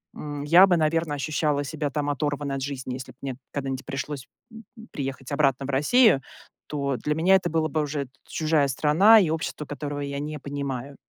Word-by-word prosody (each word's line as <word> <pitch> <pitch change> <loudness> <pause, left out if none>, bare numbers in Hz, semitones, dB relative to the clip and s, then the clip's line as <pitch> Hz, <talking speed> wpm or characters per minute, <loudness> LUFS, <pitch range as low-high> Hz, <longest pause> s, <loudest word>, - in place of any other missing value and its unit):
м, 145 -1 -6
я 170 +6 +7
бы, 180 -2 +3
наверное, 160 -1 +1
ощущала 150 0 0
себя 145 +1 -3
там 145 +1 -2
оторванной 145 0 -2
от 135 - -4
жизни. 130 -2 -4
Если 130 0 -7
бы - - -42
мне 135 -2 -3 0.2
когда-нибудь 135 -2 -4
пришлось, 140 0 -5 0.2
м, 225 0 -11
м, 225 0 -12
приехать 135 -1 -5
обратно 135 -2 +2
в - - -7
Россию, 150 - +4 0.5
то 140 -2 -2
для 150 0 -2
меня 180 +5 +4
это 175 -2 +1
было 160 0 +1
бы 155 - 0
уже 145 -2 -3 0.2
чужая 155 -2 +1
страна 165 - +6
и 180 -6 +2
общество, 160 -1 -3
которого 145 0 -5
я 140 0 -4
не 150 +1 -4
понимаю. 140 -1 -5
145 Hz, 195 wpm, -25 LUFS, 140-155 Hz, 0.5 s, я